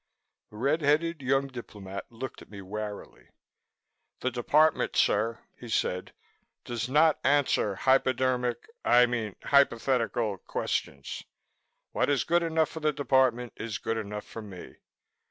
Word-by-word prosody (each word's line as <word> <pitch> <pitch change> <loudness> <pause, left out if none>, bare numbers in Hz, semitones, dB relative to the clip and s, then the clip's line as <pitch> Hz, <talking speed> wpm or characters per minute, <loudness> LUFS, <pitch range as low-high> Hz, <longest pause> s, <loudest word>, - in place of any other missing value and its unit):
The 105 - -13
red 140 +8 +1
headed 155 +2 +1
young 135 +1 +2
diplomat 105 -7 -8
looked 120 +2 -7
at - - -14
me 100 - -10
warily. 105 +1 -7 0.9
"The 130 - 0
Department, 150 +6 +2
sir," 115 +3 +2 0.2
he 120 - -9
said, 90 -4 -1 0.5
"does 120 0 -3
not 155 +3 +4
answer 140 -7 +2
hypodermic 130 0 +1 0.2
I 125 0 +6
mean 115 -4 -3
hypothetical 120 -6 +2
questions. 70 -4 -3 0.7
What - - +1
is 140 -4 +2
good 175 +1 +2
enough 160 -2 +1
for 160 - -7
the 155 -1 +1
Department 130 -4 +1
is 110 -1 -4
good 115 - -2
enough 105 -1 -6
for 115 - -8
me." 100 -4 -11
125 Hz, 135 wpm, -28 LUFS, 110-140 Hz, 0.9 s, I